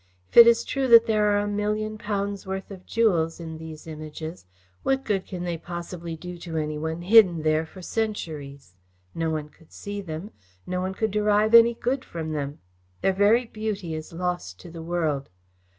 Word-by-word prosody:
If - - -22
it 235 0 +12
is 235 0 +5
true 270 -1 -1
that 230 -1 +8
there 215 -2 +2
are 205 0 +3
a 205 0 0
million 210 +1 -2
pounds' 200 -1 -3
worth 190 +1 -5
of 185 -2 -11
jewels 175 -9 +1
in 160 -1 -7
these 160 -1 -9
images, 155 - -8 0.3
what 270 0 0
good 195 -3 -1
can 180 -2 -5
they 170 -2 -3
possibly 170 -1 -6
do 180 +2 -8
to 165 -2 -5
any 150 -1 -2
one 160 +2 -3
hidden 185 -5 +6
there 155 +1 +1
for 185 +3 -12
centuries? 155 - -4 0.4
No 165 -1 -1
one 155 -1 -3
could 160 +1 -23
see 205 0 -6
them. 170 +3 -6 0.3
No 180 0 -2
one 190 +1 -3
could 220 0 -1
derive 210 +1 +2
any 235 0 +8
good 255 +3 -1
from 160 -2 -5
them. 145 -1 -4 0.4
Their 195 - +2
very 210 +5 +4
beauty 215 -6 -4
is 155 0 -6
lost 170 - -3
to 170 - -11
the 165 0 -8
world. 160 -5 -1
180 Hz, 190 wpm, -25 LUFS, 160-210 Hz, 0.4 s, it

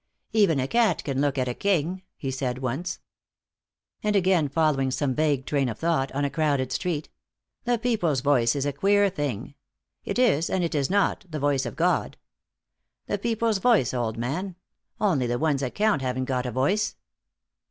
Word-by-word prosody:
"Even 200 -10 +3
a 130 - 0
cat 225 -5 +2
can 135 -1 -1
look 145 -1 0
at 130 -1 0
a 125 - -1
king," 185 +1 0 0.2
he 135 - -3
said 130 -2 -2
once. 135 +8 -3 1.0
And 210 0 0
again, 180 -6 +3
following 145 -3 +1
some 130 +1 -1
vague 145 -2 +1
train 140 -3 0
of 110 - -5
thought, 160 -5 0
on 140 +1 0
a - - 0
crowded 140 -5 0
street: 165 -5 -2 0.6
"The 245 0 +2
People's 205 - 0
voice 125 -4 +3
is 140 -1 -1
a 145 - -1
queer 200 +5 +3
thing. 140 - -4 0.5
'It - - -3
is, 205 - +3
and 185 - 0
it 170 - -1
is 140 -3 0
not, 200 +1 +1
the 155 -2 -4
voice 140 -2 +1
of 115 - -7
God.' - - 0 0.9
The 205 - -2
people's 225 -1 0
voice, 205 - +3
old 115 -3 -2
man. 165 +11 -3 0.4
Only 155 - +2
the 120 0 0
ones 145 -1 +1
that 130 -2 -3
count 210 -7 +2
haven't 130 0 -1
got 125 -1 -1
a - - -3
voice." 195 - 0
145 Hz, 185 wpm, -25 LUFS, 130-190 Hz, 1.0 s, Even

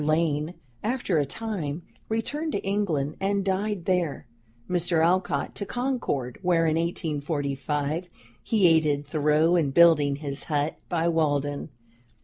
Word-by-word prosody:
Lane, 155 +1 +1 0.3
after 220 -8 0
a 145 - 0
time, 175 -7 -4 0.3
returned 290 +8 -2
to 200 - -2
England 175 -8 -1
and 195 0 0
died 195 -1 -1
there; 180 -6 0 0.4
Mr. 175 -2 +1
Alcott 175 -5 +1
to - - -4
Concord, 245 - -2
where, 170 -2 +2
in 155 -1 +2
1845, 150 -1 -2 0.3
he 215 -4 +2
aided 155 -3 +3
Thoreau 155 +3 +2
in 160 -5 +2
building 150 -2 +5
his 140 -1 -3
hut 150 -1 -1
by 170 -2 +1
Walden. 145 -3 0
165 Hz, 125 wpm, -26 LUFS, 145-185 Hz, 0.4 s, building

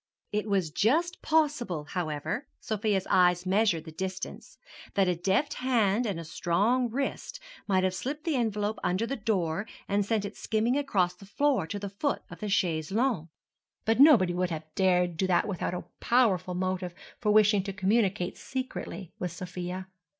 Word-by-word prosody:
It 210 +1 -1
was 190 -6 +1
just 320 - +1
possible, 290 - +1
however—Sofia's 190 - -2
eyes 180 -1 +4
measured 190 -4 +2
the 160 - -8
distance—that 190 - -4
a 180 - +2
deft 195 - +1
hand 235 -3 +1
and 190 -5 -2
a 165 - -7
strong 205 +10 +1
wrist 275 - -3 0.3
might 190 -2 +2
have 185 -1 +1
slipped 280 +10 -4
the 325 -3 0
envelope 215 -3 -1
under 185 +5 +1
the 270 - -2
door 200 -4 -1 0.2
and 200 +1 +1
sent 210 0 0
it 205 - -6
skimming 225 +3 0
across 205 -11 +1
the 195 - -15
floor 260 - +1
to 205 - -4
the 200 0 -4
foot 205 +9 -2
of - - -9
the 210 - -3
chaise 160 -5 0
longue. 220 - +1 0.6
But 225 +2 +2
nobody 240 - +7
would 180 0 0
have 160 -2 -4
dared 180 -3 +2
do 190 - +1
that 180 +3 +2
without 180 -2 -2
a 180 - -4 0.2
powerful 190 -8 +2
motive 185 -1 -2 0.2
for 210 -3 +1
wishing 210 -1 +5
to 195 - -3
communicate 195 -1 +1
secretly 255 -8 -5
with 180 -2 -2
Sofia. 180 +1 -5
200 Hz, 165 wpm, -29 LUFS, 180-230 Hz, 0.6 s, nobody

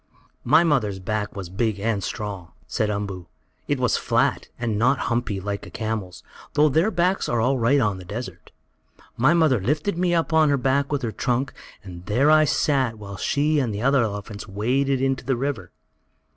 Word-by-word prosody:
"My 155 +7 +5
mother's 125 - +1
back 105 +2 -3
was 95 -3 -5
big 105 +2 -1
and 105 -2 -1
strong," 100 -6 -5
said 105 - -1
Umboo. 100 -4 -4 0.4
"It - - 0
was - - +2
flat, - - 0
and 115 -3 -2
not 125 +4 +3
humpy, 115 -6 -1
like 100 +1 -5
a - - -10
camel's, 110 -5 -4 0.3
though 150 +1 +4
their 160 +9 +2
backs 180 0 0
are 120 - +1
all 130 +3 +1
right 125 +5 +3
on 105 -6 0
the - - -9
desert. 115 +7 -7 0.6
My 135 +8 +3
mother 155 - +3
lifted 155 - -1
me 175 -1 +2
up 165 -1 0
on 160 -1 +5
her 140 - +3
back 135 +2 0
with 140 -2 -1
her 115 - -1
trunk, 125 +4 -1 0.3
and 90 -3 -10
there 135 +8 +3
I 155 0 +6
sat 135 -5 +1
while 100 -2 -8
she 150 - +1
and 125 -5 0
the 105 +2 -4
other 135 0 +4
elephants 105 -1 -4
waded 130 +7 0
into 135 0 0
the 130 0 0
river." 140 0 -3
120 Hz, 190 wpm, -23 LUFS, 105-140 Hz, 0.6 s, I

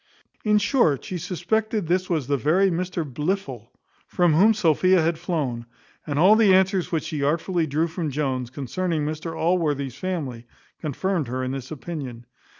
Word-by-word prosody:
In 210 -1 +3
short, 200 - +2
she 180 - -4
suspected 200 +4 -1
this 180 +3 0
was 160 -6 0
the 140 - +1
very 175 - +2
Mr 175 0 -2
Blifil, 145 - -3 0.4
from 175 -3 +2
whom 210 +8 +5
Sophia 185 -1 +3
had 160 0 0
flown; 140 -9 -2 0.4
and 145 -1 -2
all 185 +7 +6
the 210 -4 +5
answers 190 -1 +2
which 165 -2 0
she 155 -2 -4
artfully 165 +3 0
drew 155 +3 +1
from 165 -1 -3
Jones, 130 -4 -2
concerning 150 +5 -2
Mr 155 +2 -4
Allworthy's 150 -6 0
family, 135 -8 -4 0.3
confirmed 165 +1 -2
her 130 +2 -3
in 130 - -2
this 135 -1 -6
opinion. 135 -6 -7
165 Hz, 160 wpm, -24 LUFS, 140-185 Hz, 0.4 s, all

